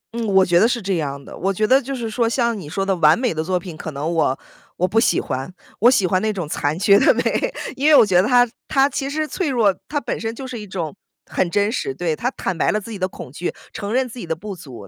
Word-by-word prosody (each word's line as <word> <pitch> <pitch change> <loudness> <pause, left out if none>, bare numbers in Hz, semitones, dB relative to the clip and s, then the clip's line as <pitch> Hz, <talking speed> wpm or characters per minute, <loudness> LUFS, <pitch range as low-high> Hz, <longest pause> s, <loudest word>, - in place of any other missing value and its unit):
嗯， 235 -1 -2
我 190 -2 +4
觉 175 -1 +3
得 220 - +5
是 245 0 0
这 195 -4 -1
样 140 -2 -4
的。 - - -11
我 195 +2 -1
觉 215 +3 0
得 260 +5 +4
就 275 +1 -5
是 235 -3 -4
说 230 +1 0
像 235 -2 0
你 150 - -9
说 195 +4 -2
的 195 - +1
完 155 -1 +5
美 245 -4 0
的 155 0 -2
作 180 +2 0
品， 175 -2 -9
可 160 - -6
能 150 +4 -3
我 145 -5 +1 0.4
我 180 - +1
不 225 +4 +2
喜 - - +3
欢， 130 +6 -4 0.3
我 235 - +6
喜 205 -7 +3
欢 185 +1 +1
那 220 - 0
种 180 -7 -4
残 150 0 -1
缺 200 +2 +5
的 - - +5
美， - - +1 0.5
因 290 +3 +2
为 305 - +7
我 230 - +8
觉 185 -3 +4
得 205 - 0
它 245 -1 +5 0.2
它 275 -2 +3
其 275 0 -3
实 310 +1 -2
脆 335 -1 -2
弱， 220 -7 +2
它 290 - -1
本 245 - -4
身 225 0 -3
就 270 - -7
是 250 -3 -6
一 210 - -8
种 175 -4 -4 0.3
很 175 - -1
真 205 +3 +1
实 135 - -3
对， 165 0 -1
它 245 - -1
坦 190 - -4
白 - - +1
了 215 - +1
自 215 +2 -10
己 205 - -6
的 185 - 0
恐 155 - -10
惧， 170 +5 -3 0.2
承 200 0 -5
认 255 +2 +1
自 245 +1 -10
己 - - -6
的 160 - -1
不 200 +4 -7
足， 125 - -11
200 Hz, 310 characters per minute, -21 LUFS, 170-240 Hz, 0.5 s, 我